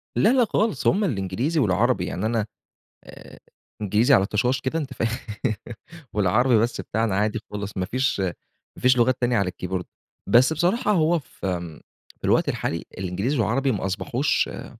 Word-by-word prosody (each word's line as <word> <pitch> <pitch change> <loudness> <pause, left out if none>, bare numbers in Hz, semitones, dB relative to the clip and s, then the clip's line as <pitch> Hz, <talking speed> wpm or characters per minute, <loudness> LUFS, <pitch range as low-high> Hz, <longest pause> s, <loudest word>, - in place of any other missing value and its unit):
لا، 210 - +4
لا 255 -3 +4
خالص 215 0 0
هم 205 +3 +3
الإنجليزي 125 - -1
والعربي، 95 -9 +2
يعني 95 - -3
أنا 110 -1 0 0.6
آآ - - -13 0.4
إنجليزي 105 +7 +4
على 95 -5 +4
طشاش 125 +6 0
كده 130 +5 -2
أنتَ 145 -4 -4
فاهم، 115 -1 0 1.1
والعربي 110 +5 +3
بس 115 +3 0
بتاعنا 110 -2 -1
عادي 105 +2 0
خالص 105 0 -4
ما 90 -1 -1
فيش 130 0 0
ما 95 -2 -7
فيش 125 0 +4
لغات 120 +1 +3
تانية 120 -1 +2
على 100 -2 +1
الكيبورد، 90 0 -4 0.4
بس 120 +8 +5
بصراحة 180 - +1
هو 170 -2 +3
في 90 - -5 0.4
الوقت - - +3
الحالي، 85 - -2
الإنجليزي 95 +9 -2
والعربي 130 +5 +1
ما 100 -3 -2
أصبحوش 130 +9 0
آآ، - - -7
115 Hz, 160 wpm, -24 LUFS, 95-135 Hz, 1.1 s, بس